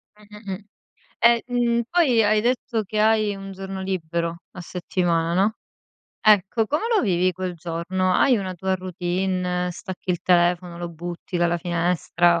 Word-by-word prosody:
Mh-mh-mh. 210 -2 -9 0.6
E, 235 0 +5
mhmm, 235 -1 +1
poi 285 -10 +4
hai 215 +1 +3
detto 240 -1 0
che 210 +2 -4
hai 215 -1 +3
un 195 0 -8
giorno 190 0 -6
libero 170 -3 -2 0.2
a 185 - -9
settimana, 170 -1 -1
no, 215 +2 +2 0.7
ecco, 215 +2 +4
come 300 +6 -1
lo 430 - +4
vivi 185 -3 +2
quel 185 0 -4
giorno? 175 +3 -1
Hai 245 +7 +4
una 190 -3 -3
tua 190 +2 -1
routine, 180 0 -2
stacchi 185 0 -6
il 175 - -1
telefono, 175 0 +2
lo 175 0 -4
butti 175 +2 -6
dalla 175 0 +2
finestra? 175 0 +1
185 Hz, 150 wpm, -23 LUFS, 175-210 Hz, 0.7 s, E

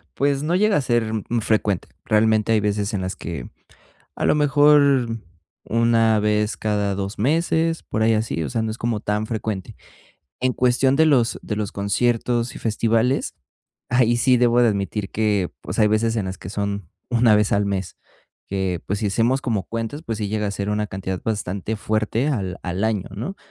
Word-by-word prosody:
pues, 140 0 +1
no 165 +4 0
llega 210 0 +3
a - - +1
ser 120 -3 0 0.3
frecuente. 105 -4 0 0.2
Realmente, 110 0 +2
hay 110 - +4
veces 105 0 -1
en 95 - -2
las 95 0 -3
que, - - -6 0.7
a - - -2
lo - - +4
mejor, 145 -5 +4 0.5
una 115 -1 +3
vez 105 0 0
cada 105 -2 0
2 100 +2 -4
meses, 165 +5 +1
por 110 - -3
ahí 115 - +4
así, 110 -7 -1
o 70 - -4
sea, 110 - -1
no 110 - -2
es 110 - -7
como 115 -2 -1
tan 105 +1 -1
frecuente. 110 -4 -4 0.6
En 130 0 +1
cuestión 130 +2 +2
de 160 0 +5
los 125 -6 +2
de 105 - -3
los 105 -1 -3
conciertos 120 +3 0
y - - -7
festivales, 115 +4 0 0.5
ahí 120 -1 +3
sí 125 +1 +4
debo 120 0 +3
de 120 - +5
admitir 100 0 -2
que, 105 -4 0
pues, - - -6
hay 105 - +5
veces 110 +2 +1
en 105 - 0
las 95 - -5
que 90 - -9
son 100 -3 -3 0.2
1 115 -3 +4
vez 105 -1 +1
al 100 0 +2
mes, 95 -2 -3 0.5
que, 95 -3 -2
pues, 100 +1 -1
si 105 - 0
hacemos 120 +6 +1
como 110 -7 -1
cuentas, 115 +6 -5
pues, 115 -2 -4
sí 105 - -2
llega 105 0 -1
a - - -1
ser 100 +1 -3
una 105 0 0
cantidad 95 -1 -4
bastante 105 0 -2
fuerte 110 +5 -1
al 95 -10 -2
al 90 +2 -3
año, 105 -4 -1
¿no? 135 - -5
110 Hz, 190 wpm, -22 LUFS, 100-120 Hz, 0.7 s, de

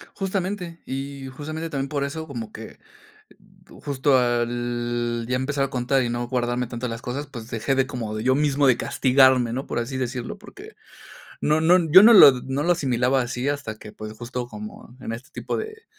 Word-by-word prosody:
Justamente 185 -3 -3
y 135 0 -6
justamente 155 +5 -6
también 135 -2 -3
por 140 0 -2
eso 160 +3 -5
como 115 -7 -7
que 110 - -10 1.0
justo 140 -1 +2
al 120 -1 -1
ya 125 +1 0
empezar 135 +2 -1
a 135 - -4
contar 130 +2 +1
y 120 - -2
no 120 0 -3
guardarme 125 0 -1
tanto 120 +1 -5
las 115 -1 -5
cosas, 135 +5 -5
pues 115 -2 -9
dejé 115 +4 -1
de 135 0 +2
como 120 -6 -5
de 110 - -4
yo 130 +2 +3
mismo 145 0 +2
de 130 -3 +5
castigarme, 130 -2 +3
¿no? 135 +3 -4
Por - - -3
así 120 +3 -3
decirlo, 125 -1 -4
porque - - -13 0.7
no 155 +1 +2
no, 175 +3 +6
yo 185 +5 +10
no 230 +3 +9
lo 195 -10 +10
no 135 +2 -2
lo 175 - +4
asimilaba 130 -4 +1
así 125 +2 -3
hasta 140 -7 -4
que, 105 - -11
pues 110 0 -8
justo 120 +2 -6
como 210 - -10
en, 115 - -5
este, 120 +4 -9
tipo - - -4
de 440 +1 -7
130 Hz, 195 wpm, -23 LUFS, 120-145 Hz, 1.0 s, yo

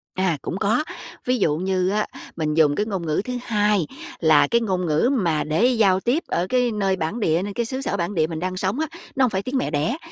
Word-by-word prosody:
À, 185 -4 +1
cũng 185 - -4
có, 220 +9 +2 0.4
ví 250 0 +2
dụ 155 -8 +1
như 185 0 0
á, 210 +2 +1 0.3
mình 155 -2 -1
dùng 150 -2 +4
cái 210 - 0
ngôn 195 -5 -3
ngữ 155 +2 0
thứ 250 - -4
hai 210 -7 +1 0.3
là 160 -2 +5
cái 235 0 +2
ngôn 185 -5 -1
ngữ 160 +9 +2
mà 170 - +1
để 155 +9 +1
giao 215 -7 +4
tiếp 250 - 0
ở 175 - 0
cái 250 -1 +2
nơi 195 -3 0
bản 175 +6 -3
địa, 165 -5 +2
nơi 205 0 -4
cái 235 +3 -1
xứ 260 +3 -4
sở 235 -7 -2
bản 175 +2 -2
địa 155 -2 +2
mình 160 -1 -5
đang 185 +1 -3
sống 190 +8 -1
á, 315 - 0 0.3
nó 270 - +3
hổng - - +1
phải 190 -3 -1
tiếng 260 +4 -2
mẹ 255 - -1
đẻ, 155 - 0
190 Hz, 255 wpm, -23 LUFS, 165-235 Hz, 0.4 s, là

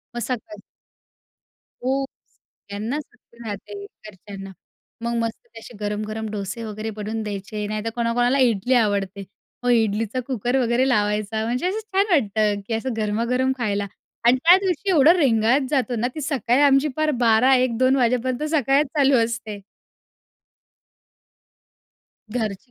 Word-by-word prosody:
मग - - -2
सकाळी 255 +8 -5 1.3
हो, 270 +1 +1 0.2
सगळ्यांना 215 +8 -7
सुट्टी 245 -4 -20
राहते 205 0 -7
घरच्यांना. 195 -1 -11 0.5
मग 235 +1 -2
मस्त 230 +1 -5
तसे 230 +1 -12
गरम-गरम 215 +1 -3
डोसे 200 +2 -5
वगैरे 215 0 -5
बनवून 215 +1 -4
द्यायचे. 210 0 -5
नाहीतर 215 +2 -3
कोणाकोणाला 245 +3 +1
इडली 245 0 +2
आवडते 200 -4 +1 0.4
हो, 245 - -1
इडलीचा 225 +1 +1
कुकर 250 0 -1
वगैरे 245 +2 +2
लावायचा. 210 -1 0
म्हणजे 250 +9 -1
असं 415 +3 -2 0.2
छान 395 +1 +4
वाटतं 215 - +2
की 225 - -2
असं 245 +3 -2
गरमागरम 235 +5 0
खायला. 205 -3 -1 0.4
आणि 240 +2 +6
त्या 350 +2 +8
दिवशी 380 0 -1
एवढं 315 -1 +6
रेंगाळत 255 -2 +3
जातो 260 -4 0
ना, 235 +3 0
ती 310 - -5
सकाळी 265 -2 +1
आमची, 280 +1 +4
पार 310 0 +1
12:00-1:00-2:00 255 +2 +4
वाजेपर्यंत 250 +2 0
सकाळच 280 0 +3
चालू 275 -2 +4
असते. 225 -3 -5 2.8
घरची 220 +1 -3
235 Hz, 130 wpm, -22 LUFS, 215-260 Hz, 2.8 s, त्या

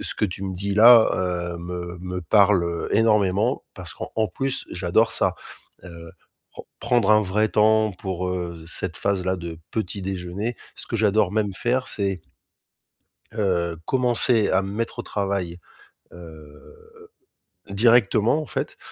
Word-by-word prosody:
que - - -6
ce - - -3
que - - 0
tu 95 0 -4
me 95 -1 -4
dis 100 +2 -3
là, 115 +2 +7
heu, 85 -2 -2
me 90 0 -6
me 90 0 -5
parle, 100 0 +4
heu, 85 0 -3
énormément, 105 +1 +2
parce 90 -2 -7
qu'en - - -8
en 110 - +2
plus 135 +8 -3
j'adore 90 +6 +1
ça, - - +2 0.5
heu, 85 -2 -11 0.4
pren - - -10 0.2
prendre 120 -4 +2
un 105 0 +6
vrai 105 +3 0
temps 110 0 +3
pour, 90 0 -4
heu, 85 -3 -5
cette 85 -1 -3
phase-là 95 -2 -1
de 85 -2 -7
petit 105 -2 -3
déjeuner. 95 +4 -4 0.2
Ce - - -9
que 115 - -3
j'adore 105 -3 +2
même 105 -2 0
faire 125 +7 -1
c'est 95 -3 -2 1.1
heu, 85 -6 -1
commencer 120 -3 +2
à 95 +1 +2
me 95 0 -6
mettre 115 +3 -4
au - - 0
travail, 95 -4 -3 0.5
heu, 85 - -15 0.6
directement, 115 +5 +3
en 155 - -6
fait - - -4
95 Hz, 155 wpm, -23 LUFS, 90-110 Hz, 1.1 s, là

